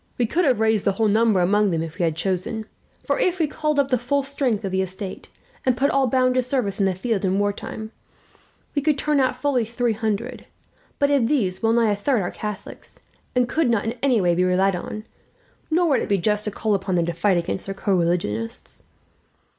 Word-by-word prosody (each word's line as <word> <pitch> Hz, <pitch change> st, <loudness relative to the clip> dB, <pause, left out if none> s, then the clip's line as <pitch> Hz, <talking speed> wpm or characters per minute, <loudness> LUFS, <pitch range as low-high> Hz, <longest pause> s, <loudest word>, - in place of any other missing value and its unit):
We 245 Hz, -, +2 dB
could 335 Hz, +10 st, +1 dB
have 255 Hz, -6 st, +2 dB
raised 220 Hz, -2 st, +2 dB
the 200 Hz, -, +2 dB
whole 220 Hz, +3 st, +1 dB
number 215 Hz, -2 st, +3 dB
among 205 Hz, +3 st, +3 dB
them, 165 Hz, -3 st, 0 dB
had 165 Hz, +3 st, -8 dB
we 170 Hz, -2 st, +2 dB
chosen; 190 Hz, +6 st, -2 dB, 0.4 s
for -, -, 0 dB
if 365 Hz, -6 st, +1 dB
we 325 Hz, -, +2 dB
called 300 Hz, 0 st, -2 dB
up 280 Hz, -1 st, +2 dB
the 255 Hz, -2 st, +2 dB
full 275 Hz, +4 st, 0 dB
strength 265 Hz, -7 st, -1 dB
of 190 Hz, -, -3 dB
the 190 Hz, 0 st, +1 dB
estate, 190 Hz, +1 st, -6 dB, 0.3 s
and 255 Hz, -2 st, +1 dB
put 280 Hz, +2 st, +2 dB
all 275 Hz, -1 st, +2 dB
bound 255 Hz, +1 st, +2 dB
to 255 Hz, -, +2 dB
service 245 Hz, -6 st, -1 dB
in 195 Hz, -, +3 dB
the 185 Hz, -, 0 dB
field 210 Hz, +1 st, -1 dB
in 190 Hz, 0 st, +1 dB
war 205 Hz, 0 st, +1 dB
time, 220 Hz, +2 st, -7 dB, 0.8 s
we 285 Hz, -, 0 dB
could 300 Hz, 0 st, +1 dB
turn 300 Hz, 0 st, +1 dB
out 260 Hz, -1 st, +2 dB
fully 255 Hz, -2 st, +1 dB
three 235 Hz, +1 st, -1 dB
hundred; 220 Hz, +2 st, -3 dB, 0.5 s
but 285 Hz, 0 st, +2 dB
of 270 Hz, -5 st, +3 dB
these 200 Hz, -10 st, 0 dB
well 225 Hz, 0 st, +2 dB
nigh 230 Hz, -2 st, +3 dB
a -, -, +1 dB
third 215 Hz, +1 st, 0 dB
are 175 Hz, -, -3 dB
Catholics, 210 Hz, -2 st, -7 dB, 0.4 s
and 250 Hz, -1 st, +3 dB
could 310 Hz, 0 st, +1 dB
not 225 Hz, -3 st, +1 dB
in 225 Hz, -, -1 dB
any 260 Hz, -5 st, +3 dB
way 175 Hz, -3 st, +2 dB
be 180 Hz, +2 st, +2 dB
relied 185 Hz, +1 st, +2 dB
on, 215 Hz, +4 st, -6 dB, 0.7 s
nor 340 Hz, +1 st, +2 dB
would 275 Hz, -, +3 dB
it -, -, -4 dB
be 200 Hz, -, +3 dB
just 210 Hz, +3 st, 0 dB
to -, -, 0 dB
call 215 Hz, +1 st, -1 dB
upon 195 Hz, -1 st, -1 dB
them 170 Hz, -1 st, +2 dB
to 170 Hz, -, -2 dB
fight 180 Hz, +2 st, +2 dB
against 170 Hz, +2 st, -3 dB
their 195 Hz, -, -4 dB
co 200 Hz, 0 st, 0 dB
religionists. 170 Hz, -, -1 dB
220 Hz, 230 wpm, -23 LUFS, 190-255 Hz, 0.8 s, number